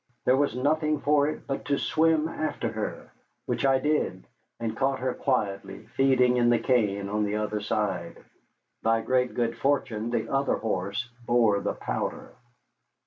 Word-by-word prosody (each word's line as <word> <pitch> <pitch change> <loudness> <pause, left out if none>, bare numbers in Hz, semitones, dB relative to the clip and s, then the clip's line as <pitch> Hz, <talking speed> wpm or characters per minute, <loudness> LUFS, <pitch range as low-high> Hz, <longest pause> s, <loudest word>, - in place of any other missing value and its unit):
There 130 - +5
was 140 -3 +1
nothing 150 +3 +1
for 145 0 +3
it 155 - -5
but 135 - -4
to 140 -1 +1
swim 160 0 +2
after 155 -1 -3
her, - - -5 0.3
which 140 - 0
I 135 0 +4
did, 130 -10 0 0.4
and 115 -1 -3
caught 135 +2 +1
her 130 -1 -1
quietly 105 -8 -2
feeding 130 -2 +4
in 120 -1 +4
the 120 - +4
cane 105 -6 +1
on 105 +1 0
the 105 0 -1
other 105 0 -1
side. 105 -3 -2 0.6
By 115 0 +2
great 125 +2 +1
good 115 -1 0
fortune 120 -5 0
the 120 - -1
other 135 +1 +1
horse 100 +2 -2 0.2
bore 115 -4 +4
the - - -1
powder. - - -4
125 Hz, 160 wpm, -27 LUFS, 105-140 Hz, 0.6 s, There